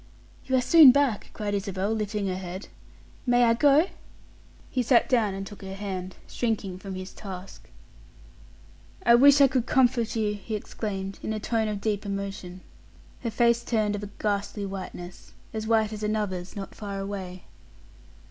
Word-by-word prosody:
"You 260 - +2
are 255 - +3
soon 315 -2 +9
back," 270 -5 +1
cried 210 -2 -4
Isabel, 195 0 -1
lifting 210 -1 -2
her 185 -1 -1
head. 185 +1 -7 0.6
"May 245 0 +4
I 230 -1 +5
go?" 290 +6 +5 0.9
He 255 - +1
sat 245 0 +4
down 220 -6 +2
and 195 0 -5
took 205 +1 -11
her 195 0 -7
hand, 190 -2 -5
shrinking 205 -6 -2
from 195 -1 -7
his 185 0 -7
task. 190 -2 -9 1.4
"I 235 - +7
wish 280 +4 +7
I 275 - +8
could 255 -2 -1
comfort 245 -3 +2
you!" 215 -2 0
he 210 +2 -5
exclaimed, 195 -2 -5
in 220 - -3
a 215 - -3
tone 220 0 0
of 210 -1 -3
deep 210 -2 -1
emotion. 195 -2 -5 0.6
Her 235 - -2
face 235 +1 +2
turned 215 -3 0
of 205 - -5
a 205 - -6
ghastly 205 0 -2
whiteness 185 -2 -8 0.2
as 220 0 -4
white 220 -1 +2
as 210 - -6
another's 205 -4 -2
not 195 -2 -6
far 200 -2 -6
away. 190 -2 -6
210 Hz, 165 wpm, -26 LUFS, 195-230 Hz, 1.4 s, soon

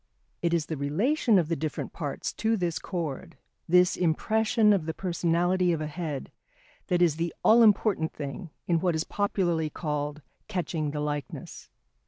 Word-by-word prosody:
It 170 - +1
is 170 -3 +1
the 160 0 -4
relation 205 - +2
of 170 -4 +2
the 165 - 0
different 155 -2 -4
parts 145 -4 -4
to 225 0 0
this 175 -3 -1
chord, 170 -2 -5 0.3
this 180 +1 +5
impression 215 +5 +2
of 175 -6 0
the 160 - -3
personality 175 0 +1
of 165 - -1
a 155 - -2
head, 150 -3 -5 0.6
that 180 0 +3
is 160 -3 +2
the 165 0 -1
all 230 +2 +6
important 205 -6 +3
thing 150 +5 -6 0.2
in 170 -2 +2
what 175 -1 +1
is 160 - 0
popularly 175 -6 0
called 150 -1 -3 0.2
"catching 160 -4 -2
the 150 0 -3
likeness." 150 -1 -5
170 Hz, 165 wpm, -27 LUFS, 155-185 Hz, 0.6 s, all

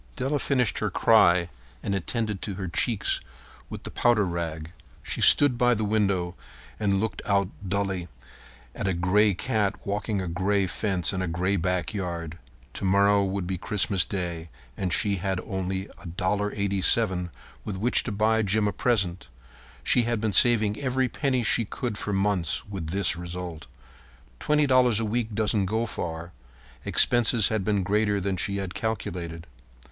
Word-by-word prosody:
Della 140 +2 -1
finished 125 -7 0
her - - -1
cry 85 0 +4 0.4
and 100 - -2
attended 105 +1 -2
to 100 - -4
her 95 -1 -5
cheeks 105 +5 0 0.5
with - - -8
the - - -6
powder 120 -4 +2
rag. 85 -2 -4 0.3
She - - -2
stood 135 -4 +8
by 125 -1 +4
the 110 - -2
window 100 -4 0 0.5
and 100 -2 +1
looked 105 -1 -3
out 100 -2 +1 0.2
dully 95 -2 -1 0.7
at - - -4
a 95 - 0
gray 100 +3 +3
cat 105 -1 0
walking 105 +1 -2
a 95 - -3
gray 95 +3 0
fence 95 -4 -1
in 95 - -2
a 95 - -2
gray 90 +4 0
backyard. 85 -2 -3 0.3
Tomorrow 100 +1 +3
would 95 -1 -3
be 95 0 -3
Christmas 100 -2 +1
Day, 85 -5 -5 0.3
and 95 -2 -3
she 100 +4 +1
had 95 0 -2
only 95 -1 -3 0.2
$1.87 100 +1 0 0.3
with 100 -3 -5
which 115 +6 +2
to 125 - -4
buy 110 +2 +2
Jim 105 +1 +1
a 100 - -1
present. 95 -7 0 0.6
She 125 - +3
had 120 -1 -1
been 110 -1 -1
saving 110 -3 +4
every 130 -1 0
penny 130 -1 -1
she 115 +1 +3
could 115 +2 -4
for 105 - -4
months, 95 -5 0
with 95 -6 -6
this 95 +2 0
result. 85 -4 -7 0.7
Twenty 150 0 +2
dollars 125 -5 +4
a 115 - -1
week 110 0 -2
doesn't 105 -2 +1
go 110 +4 0
far. 85 -5 -5 0.5
Expenses 120 -3 +3
had 110 -3 -1
been 100 -1 0
greater 105 +1 +1
than 95 0 -2
she 100 +2 -1
had 95 -2 -4
calculated. 85 -7 -4
100 Hz, 160 wpm, -26 LUFS, 90-110 Hz, 0.7 s, stood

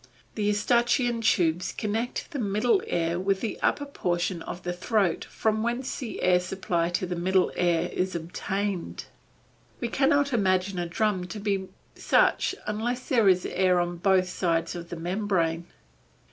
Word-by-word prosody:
The 215 - -4
Eustachian 235 +3 +2
tubes 180 -7 +2
connect 225 +7 -3
the 290 - -4
middle 215 +2 +2
ear 170 0 0
with 195 +1 +1
the 225 - -3
upper 285 - +1
portion 175 -9 -2
of 175 +2 -7
the 175 - -2
throat 185 -1 0
from 220 0 -1
whence 240 +3 -2
the 245 -4 -5
air 180 0 +5
supply 180 -2 -1
to 175 +1 -1
the 180 0 -3
middle 185 +2 +2
ear 175 -1 +2
is 185 0 -1
obtained. 190 +3 -3 0.7
We 240 - -2
cannot 285 +1 +2
imagine 190 -3 +1
a 175 - -2
drum 190 +1 0
to 210 +4 -7
be 195 -2 -1 0.3
such - - +2
unless 240 +4 -2
there 230 -8 +4
is 185 -1 +3
air 185 -1 +2
on 175 0 -1
both 185 +1 +3
sides 170 -2 -1
of 170 -1 -7
the - - -5
membrane. 170 -2 -1
190 Hz, 160 wpm, -27 LUFS, 175-220 Hz, 0.7 s, air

